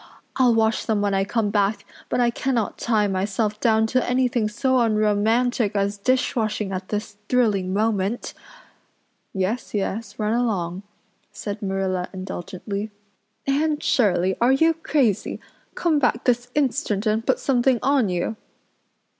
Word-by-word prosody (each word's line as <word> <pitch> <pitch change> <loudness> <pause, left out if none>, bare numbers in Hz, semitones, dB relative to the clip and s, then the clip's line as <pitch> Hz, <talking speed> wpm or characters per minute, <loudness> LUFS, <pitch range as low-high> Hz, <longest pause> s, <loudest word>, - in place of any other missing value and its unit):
I'll 250 -3 +4
wash 220 0 +1
them 220 -2 +1
when 200 -1 +1
I 195 0 +2
come 210 0 -1
back, 200 0 0 0.2
but - - 0
I 240 -1 +3
cannot 235 -3 -1
tie 220 -3 +2
myself 205 +2 -1
down 220 -2 +3
to 255 +3 +1
anything 250 -3 +1
so 260 +4 +1
unromantic 220 +1 +2
as 200 0 0
dishwashing 215 -3 0
at 185 0 -5
this 210 -1 -4
thrilling 210 -7 +2
moment." 210 +1 -1 1.0
"Yes, 200 +5 -2
yes, 205 +1 -3
run 215 0 0
along," 195 -7 -1 0.5
said 205 0 -6
Marilla 190 -2 -2
indulgently. 190 +2 -5 0.6
"Anne 295 +2 +1
Shirley 190 -9 +2
are 240 +2 +5
you 325 +4 +4
crazy? 275 - 0 0.4
Come 320 -4 +2
back 245 -3 +1
this 245 0 +1
instant 260 -7 0
and 215 +1 +1
put - - +2
something 255 -1 +2
on 265 -5 +3
you. 180 +5 -2
220 Hz, 140 wpm, -23 LUFS, 200-245 Hz, 1.0 s, are